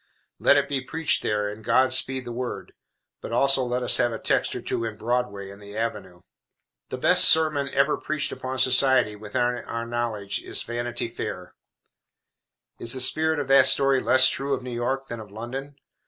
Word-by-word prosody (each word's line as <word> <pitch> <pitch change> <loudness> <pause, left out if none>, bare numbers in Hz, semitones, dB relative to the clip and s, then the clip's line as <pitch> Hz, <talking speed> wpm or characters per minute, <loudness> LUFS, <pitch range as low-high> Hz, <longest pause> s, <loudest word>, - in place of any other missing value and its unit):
Let 145 - +4
it 140 -1 +1
be 140 -2 -2
preached 160 +3 0
there 105 -1 -1
and 105 +2 -8
God 130 +4 +2
speed 130 -1 +1
the 120 - -7
Word. 125 +1 -6 0.5
But - - -8
also 135 +2 +3
let 125 0 -2
us 125 - +4
have 120 - +1
a 115 - -4
text - - 0
or - - -5
two - - -3
in 110 -2 -5
Broadway 110 -4 -3
and 100 +1 -13
the 100 +1 -10
Avenue. 95 -6 -5 0.7
The - - -5
best - - +6
sermon 155 -3 +3
ever 140 +2 +1
preached 155 -2 -3
upon 130 0 -6
society, 130 -4 +3
within 105 +2 -4
our 120 -1 -3
knowledge, 115 -4 -3
is - - -1
Vanity 120 0 -4
Fair. 105 -5 -7 1.3
Is 115 - -1
the 130 - -3
spirit 160 +5 +3
of 145 -2 -3
that 135 -1 +6
story 135 -1 +3
less 130 0 +5
true 140 0 -1
of 130 - -9
New 125 -1 -7
York 130 +3 -2
than 115 -3 -7
of 105 -2 -11
London? 130 +7 -8
125 Hz, 190 wpm, -24 LUFS, 115-135 Hz, 1.3 s, best